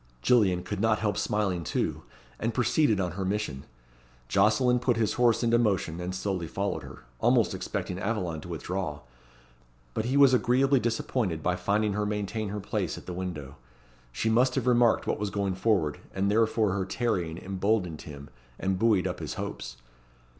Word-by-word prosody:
Gillian 95 - +3
could - - -4
not 110 0 +3
help 105 -2 -1
smiling 100 -5 0
too, - - -2 0.4
and 115 0 -2
proceeded 125 -3 +2
on 90 -2 -1
her 95 +3 -4
mission. 95 -9 -2 0.6
Jocelyn 125 - +3
put 120 -1 +1
his 110 -2 +1
horse 120 -1 +3
into 120 0 +3
motion, 95 -7 0
and 90 +1 -4
slowly 95 -3 -2
followed 100 +4 -2
her, - - -11 0.2
almost - - +3
expecting 90 - -4
Aveline 95 -7 -2
to - - -10
withdraw. 85 -2 -4 0.9
But 110 - -2
he 130 +4 +1
was 140 -2 +7
agreeably 130 +2 +3
disappointed 110 -8 -1
by 90 - +1
finding 100 +3 0
her 105 +1 -1
maintain 105 +1 -2
her 105 +1 -4
place 95 - -2
at - - -11
the 90 - -5
window. 80 -7 -5 0.5
She 110 - -2
must 125 +3 +3
have - - 0
remarked 120 -2 +4
what - - -1
was 105 -1 -1
going 100 -1 -1
forward, 95 -6 +1 0.2
and 100 +1 +1
therefore 110 -1 +2
her 95 0 -1
tarrying 95 -6 -1
emboldened 95 -3 -1
him, 70 -3 -10 0.3
and 95 -1 -1
buoyed 105 -5 +3
up - - -3
his - - -5
hopes. - - -6
100 Hz, 175 wpm, -28 LUFS, 90-115 Hz, 0.9 s, was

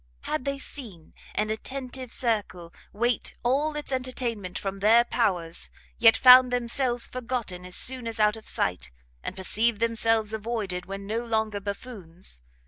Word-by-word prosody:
had 305 -5 -3
they 275 0 -1
seen 215 - -6 0.2
an 215 +1 0
attentive 255 +2 -5
circle 205 -8 -2 0.2
wait 240 +3 -1
all 285 +5 +1
its 295 -2 -3
entertainment 245 -7 -2
from 195 0 -4
their 225 +4 +6
powers, 180 -9 -1 0.3
yet 225 -1 +7
found 255 0 +8
themselves 245 0 +1
forgotten 235 -8 -4
as 180 - -2
soon 255 -2 0
as 225 0 -3
out 210 0 +4
of 220 - -11
sight, 90 -8 -1 0.3
and - - -5
perceived 215 +4 +2
themselves 225 -1 +1
avoided 210 -5 -3
when 195 0 -6
no 225 +3 -2
longer 220 -3 -1
buffoons! 195 - -6
225 Hz, 145 wpm, -26 LUFS, 200-250 Hz, 0.3 s, found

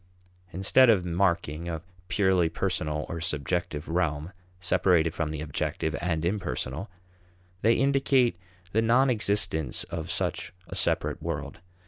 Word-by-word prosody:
Instead 95 +8 +5
of 95 -6 +4
marking 85 -2 0
a 80 -1 -4 0.2
purely 95 -4 +3
personal 75 -1 -1
or 85 0 -5
subjective 80 0 -2
realm, 80 0 -1 0.3
separated 85 -2 +3
from 80 -2 -2
the 75 -1 -4
objective 80 +1 -2
and 85 -2 -1
impersonal, 95 -3 -2 0.7
they 115 +2 +4
indicate 135 -3 +3 0.4
the 110 - +2
non 125 +4 +4
existence 100 - 0
of 80 -1 -4
such - - -2
a - - -7
separate - - 0
world. - - -4
85 Hz, 125 wpm, -27 LUFS, 80-100 Hz, 0.7 s, Instead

